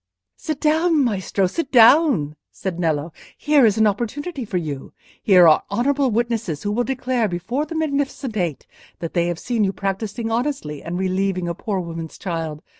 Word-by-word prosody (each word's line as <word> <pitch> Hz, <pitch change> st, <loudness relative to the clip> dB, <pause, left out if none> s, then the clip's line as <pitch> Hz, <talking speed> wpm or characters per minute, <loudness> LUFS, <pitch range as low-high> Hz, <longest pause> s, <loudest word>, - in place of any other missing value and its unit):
"Sit 310 Hz, -3 st, -4 dB
down, 315 Hz, 0 st, +3 dB
Maestro, 200 Hz, -4 st, 0 dB
sit 285 Hz, -, -3 dB
down," 235 Hz, -, +5 dB, 0.2 s
said 185 Hz, -3 st, -5 dB
Nello. 160 Hz, -1 st, -1 dB, 0.2 s
"Here 295 Hz, -5 st, +4 dB
is 210 Hz, -, +1 dB
an 220 Hz, -, +4 dB
opportunity 250 Hz, -, -2 dB
for 200 Hz, -4 st, -2 dB
you; 150 Hz, -6 st, -5 dB, 0.3 s
here 180 Hz, -4 st, +6 dB
are 155 Hz, -, +6 dB
honourable 275 Hz, +2 st, +1 dB
witnesses 230 Hz, -8 st, -1 dB
who 205 Hz, -, -1 dB
will 240 Hz, +4 st, +1 dB
declare 255 Hz, -3 st, -1 dB
before 235 Hz, -, -3 dB
the 330 Hz, -, -6 dB
Magnificent 280 Hz, -5 st, -2 dB
Eight 175 Hz, -8 st, -2 dB, 0.3 s
that 165 Hz, -2 st, -6 dB
they 170 Hz, -1 st, +1 dB
have 175 Hz, -1 st, -2 dB
seen 230 Hz, +3 st, -1 dB
you 195 Hz, -, +1 dB
practising 205 Hz, +4 st, -3 dB
honestly 230 Hz, -, -2 dB
and 170 Hz, +1 st, -5 dB
relieving 185 Hz, -1 st, -1 dB
a 170 Hz, -, -1 dB
poor 195 Hz, +2 st, -3 dB
woman's 165 Hz, -2 st, -6 dB
child. 165 Hz, -4 st, -4 dB
210 Hz, 175 wpm, -21 LUFS, 175-265 Hz, 0.3 s, here